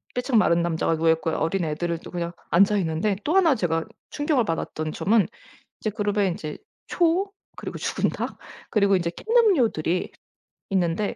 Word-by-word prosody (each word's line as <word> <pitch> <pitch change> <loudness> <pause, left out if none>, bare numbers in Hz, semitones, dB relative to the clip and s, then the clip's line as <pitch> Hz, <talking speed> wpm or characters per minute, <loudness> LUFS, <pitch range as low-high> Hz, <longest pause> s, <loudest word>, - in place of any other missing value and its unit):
삐쩍 250 -1 +1
마른 170 -5 +4
남자가 165 -1 0
누워 165 0 +2
있고요. 160 0 0
어린 175 +3 0
애들은 165 +2 -2
또 - - -10
그냥 170 -1 -3 0.2
앉아 200 +4 +5
있는데 170 +4 0
또 320 +5 0
1 335 -7 +5
제가 165 -6 -1 0.3
충격을 290 -5 +1
받았던 155 -2 -3
점은 215 0 +2 0.5
인제 215 - -1
그룹에 205 -1 +1
이제 155 -4 -5 0.3
초 355 +3 +1 0.3
그리고 - - -6
죽은 - - 0
닭 - - -5 0.3
그리고 200 -2 +3
인제 170 -2 -1
캔음료들이 260 - +2 0.6
있는데 185 +1 0
195 Hz, 340 characters per minute, -24 LUFS, 165-230 Hz, 0.6 s, 앉아